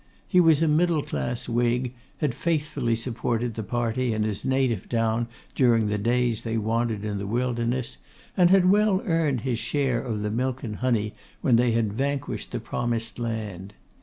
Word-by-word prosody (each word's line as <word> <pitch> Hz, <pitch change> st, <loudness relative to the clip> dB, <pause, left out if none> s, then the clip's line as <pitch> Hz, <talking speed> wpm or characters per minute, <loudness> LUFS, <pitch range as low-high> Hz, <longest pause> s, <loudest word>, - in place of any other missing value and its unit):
He 180 Hz, -, +4 dB
was 165 Hz, -2 st, +5 dB
a -, -, +3 dB
middle 155 Hz, 0 st, +2 dB
class 70 Hz, -, -3 dB
Whig, 120 Hz, +1 st, 0 dB, 0.2 s
had 145 Hz, -5 st, 0 dB
faithfully 145 Hz, -5 st, 0 dB
supported 115 Hz, 0 st, -2 dB
that 110 Hz, -, -4 dB
party 120 Hz, 0 st, 0 dB
in 110 Hz, -, 0 dB
his 105 Hz, -2 st, -2 dB
native 130 Hz, -6 st, 0 dB
town 115 Hz, 0 st, +1 dB, 0.3 s
during 115 Hz, -5 st, +3 dB
the 105 Hz, 0 st, 0 dB
days 120 Hz, 0 st, +1 dB
they 115 Hz, -1 st, -2 dB
wandered 110 Hz, -1 st, -1 dB
in 105 Hz, -1 st, -2 dB
the 100 Hz, -, -4 dB
wilderness, 120 Hz, +1 st, -1 dB, 0.4 s
and 180 Hz, -2 st, +5 dB
had 185 Hz, -1 st, +5 dB
well 205 Hz, -1 st, +3 dB
earned 160 Hz, -, +1 dB
his 120 Hz, -1 st, -1 dB
share 135 Hz, -4 st, 0 dB
of 110 Hz, -5 st, -3 dB
the 105 Hz, -, -1 dB
milk 130 Hz, +3 st, -2 dB
and 105 Hz, -4 st, -4 dB
honey 115 Hz, -4 st, 0 dB, 0.3 s
when 125 Hz, -, +4 dB
they 120 Hz, 0 st, +3 dB
had 110 Hz, -3 st, +1 dB
vanquished 140 Hz, +3 st, -2 dB
the -, -, -2 dB
promised 115 Hz, -1 st, -3 dB
land. 105 Hz, -4 st, -4 dB
120 Hz, 175 wpm, -25 LUFS, 115-135 Hz, 0.4 s, was